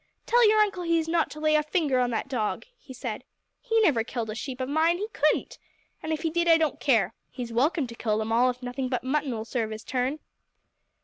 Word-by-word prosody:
"Tell 475 Hz, -2 st, +5 dB
your 430 Hz, 0 st, +4 dB
uncle 400 Hz, -4 st, +2 dB
he 335 Hz, -1 st, +1 dB
is 325 Hz, -1 st, -1 dB
not 330 Hz, -1 st, +1 dB
to 305 Hz, -, -9 dB
lay 310 Hz, 0 st, +2 dB
a 305 Hz, -, +4 dB
finger 300 Hz, -4 st, 0 dB
on 250 Hz, -1 st, +2 dB
that 230 Hz, -, -2 dB
dog!" 240 Hz, -, -2 dB
he 300 Hz, -, -15 dB
said. 245 Hz, -3 st, -5 dB, 0.4 s
"He 455 Hz, -2 st, +1 dB
never 285 Hz, -, +3 dB
killed 230 Hz, -2 st, -4 dB
a -, -, -4 dB
sheep 255 Hz, +3 st, -6 dB
of 255 Hz, -, -2 dB
mine 320 Hz, +4 st, +2 dB
he 415 Hz, +3 st, -3 dB
couldn't! 305 Hz, -8 st, 0 dB, 0.4 s
And 315 Hz, -, -4 dB
if 315 Hz, +1 st, -2 dB
he 325 Hz, -, 0 dB
did 345 Hz, +1 st, 0 dB
I 330 Hz, -1 st, +7 dB
don't 315 Hz, -2 st, 0 dB
care! 225 Hz, -10 st, +2 dB, 0.2 s
He's 245 Hz, -2 st, -6 dB
welcome 285 Hz, +5 st, +2 dB
to 235 Hz, -, -9 dB
kill 220 Hz, -2 st, -1 dB
them 220 Hz, +1 st, -2 dB
all, 245 Hz, +3 st, +4 dB
if 250 Hz, 0 st, -5 dB
nothing 250 Hz, +1 st, -3 dB
but 250 Hz, -2 st, -2 dB
mutton'll 260 Hz, -5 st, -1 dB
serve 230 Hz, -2 st, -2 dB
his 215 Hz, 0 st, -7 dB
turn." 260 Hz, +3 st, -1 dB
270 Hz, 240 wpm, -27 LUFS, 240-325 Hz, 0.4 s, I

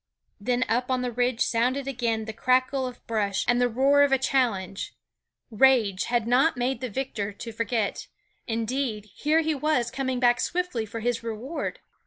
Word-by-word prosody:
Then 245 Hz, +4 st, 0 dB
up 245 Hz, +3 st, 0 dB
on 255 Hz, -1 st, 0 dB
the 250 Hz, -, -2 dB
ridge 245 Hz, 0 st, 0 dB
sounded 255 Hz, +4 st, +1 dB
again 230 Hz, -4 st, -1 dB
the 220 Hz, -, -6 dB
crackle 255 Hz, +3 st, +1 dB
of 250 Hz, -1 st, -10 dB
brush 205 Hz, -3 st, -1 dB
and 245 Hz, 0 st, +3 dB
the 245 Hz, -, +3 dB
roar 275 Hz, +4 st, +4 dB
of 285 Hz, -1 st, +4 dB
a 270 Hz, -, +5 dB
challenge. 225 Hz, -8 st, -1 dB, 0.6 s
Rage 220 Hz, -5 st, +3 dB
had 240 Hz, -2 st, 0 dB
not 260 Hz, +5 st, +3 dB
made 250 Hz, +1 st, -1 dB
the 255 Hz, -, -3 dB
victor 215 Hz, -3 st, -3 dB
to 230 Hz, +3 st, -7 dB
forget; 225 Hz, -1 st, -2 dB, 0.4 s
indeed, 225 Hz, -2 st, -2 dB
here 310 Hz, +2 st, +2 dB
he 315 Hz, 0 st, 0 dB
was, 285 Hz, -4 st, 0 dB
coming 260 Hz, -1 st, -2 dB
back 245 Hz, -1 st, +4 dB
swiftly 345 Hz, -11 st, -1 dB
for 225 Hz, +1 st, -6 dB
his 240 Hz, 0 st, -1 dB
reward. 230 Hz, +7 st, -5 dB
245 Hz, 175 wpm, -26 LUFS, 225-265 Hz, 0.6 s, a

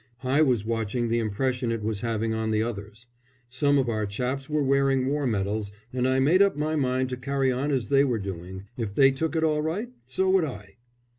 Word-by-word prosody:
I 135 Hz, +4 st, +2 dB
was 125 Hz, -8 st, +2 dB
watching 115 Hz, +1 st, -1 dB
the 115 Hz, +1 st, +1 dB
impression 120 Hz, +3 st, -1 dB
it 115 Hz, -2 st, -3 dB
was 105 Hz, -2 st, -2 dB
having 115 Hz, -1 st, -1 dB
on 110 Hz, 0 st, -1 dB
the 110 Hz, 0 st, +1 dB
others. 110 Hz, 0 st, -6 dB, 0.4 s
Some 140 Hz, +3 st, +2 dB
of 135 Hz, -2 st, +1 dB
our 110 Hz, -2 st, -1 dB
chaps 130 Hz, +7 st, -3 dB
were 150 Hz, -1 st, +1 dB
wearing 135 Hz, -1 st, +2 dB
war 140 Hz, +1 st, 0 dB
medals, 105 Hz, -1 st, -1 dB, 0.2 s
and 130 Hz, 0 st, +1 dB
I 130 Hz, 0 st, +2 dB
made 160 Hz, +8 st, +4 dB
up 200 Hz, -5 st, +3 dB
my 155 Hz, +1 st, -1 dB
mind 130 Hz, -2 st, 0 dB
to 125 Hz, -, -4 dB
carry 135 Hz, +1 st, 0 dB
on 130 Hz, +4 st, -1 dB
as 130 Hz, -5 st, -1 dB
they 140 Hz, 0 st, +5 dB
were 125 Hz, -5 st, +1 dB
doing. 95 Hz, -1 st, -6 dB
If 110 Hz, -4 st, -4 dB
they 135 Hz, -1 st, +6 dB
took 160 Hz, +4 st, -2 dB
it 160 Hz, -, +1 dB
all 155 Hz, -1 st, +2 dB
right, 180 Hz, +10 st, -2 dB, 0.2 s
so 190 Hz, +9 st, 0 dB
would 190 Hz, -4 st, +4 dB
I. 105 Hz, -7 st, -9 dB
130 Hz, 220 wpm, -26 LUFS, 110-140 Hz, 0.4 s, they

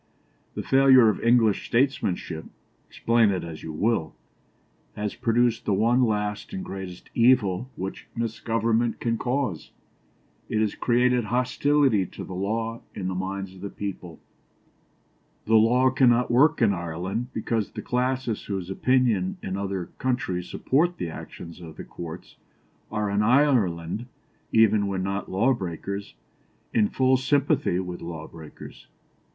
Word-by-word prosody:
The -, -, -3 dB
failure 135 Hz, -3 st, +6 dB
of 105 Hz, -, -1 dB
English 115 Hz, -3 st, +3 dB
statesmanship, 100 Hz, -, 0 dB, 0.4 s
explain 115 Hz, -2 st, +2 dB
it 95 Hz, -2 st, -1 dB
as 80 Hz, -2 st, -8 dB
you 80 Hz, -, -6 dB
will, 100 Hz, +1 st, 0 dB, 0.8 s
has 105 Hz, 0 st, -3 dB
produced 115 Hz, 0 st, +1 dB
the 100 Hz, -, +2 dB
one 120 Hz, +5 st, +3 dB
last 105 Hz, -, -1 dB
and 190 Hz, -1 st, -4 dB
greatest 95 Hz, -2 st, -8 dB
evil 120 Hz, -2 st, +3 dB
which 95 Hz, +1 st, -6 dB
misgovernment 115 Hz, 0 st, 0 dB
can 115 Hz, -1 st, -1 dB
cause. 125 Hz, -, -2 dB, 0.8 s
It 110 Hz, -, 0 dB
has 110 Hz, -1 st, +1 dB
created 125 Hz, 0 st, +2 dB
hostility 125 Hz, -2 st, +2 dB
to -, -, -9 dB
the -, -, -8 dB
law 110 Hz, +5 st, -2 dB
in 95 Hz, -2 st, -3 dB
the -, -, -2 dB
minds 95 Hz, +1 st, -4 dB
of 95 Hz, -, -14 dB
the 100 Hz, -, -5 dB
people. 95 Hz, -5 st, -7 dB, 1.3 s
The 110 Hz, -, 0 dB
law 120 Hz, +4 st, +5 dB
cannot 125 Hz, -2 st, +3 dB
work 145 Hz, +3 st, +4 dB
in 105 Hz, -3 st, +4 dB
Ireland 90 Hz, +6 st, -3 dB
because 110 Hz, -1 st, -2 dB
the -, -, -8 dB
classes 125 Hz, -2 st, -1 dB
whose 95 Hz, -2 st, -4 dB
opinion 115 Hz, -5 st, +1 dB
in 95 Hz, -, -3 dB
other 95 Hz, -2 st, -4 dB
countries 110 Hz, -9 st, -2 dB
supports 170 Hz, +6 st, +1 dB
the 85 Hz, -, -4 dB
actions 85 Hz, +2 st, -9 dB
of 80 Hz, -2 st, -10 dB
the -, -, -6 dB
courts, 85 Hz, 0 st, -9 dB, 0.5 s
are 105 Hz, -1 st, -1 dB
in 100 Hz, +1 st, +1 dB
Ireland, 110 Hz, -, +2 dB, 0.4 s
even 110 Hz, -2 st, +4 dB
when 95 Hz, -1 st, -2 dB
not 100 Hz, +1 st, -3 dB
law 115 Hz, +8 st, +3 dB
breakers, 100 Hz, 0 st, -5 dB, 0.6 s
in 105 Hz, -2 st, +3 dB
full 130 Hz, 0 st, +3 dB
sympathy 140 Hz, -, +1 dB
with 90 Hz, -1 st, -4 dB
law 80 Hz, -2 st, -6 dB
breakers." 80 Hz, -2 st, -12 dB
110 Hz, 140 wpm, -25 LUFS, 95-125 Hz, 1.3 s, failure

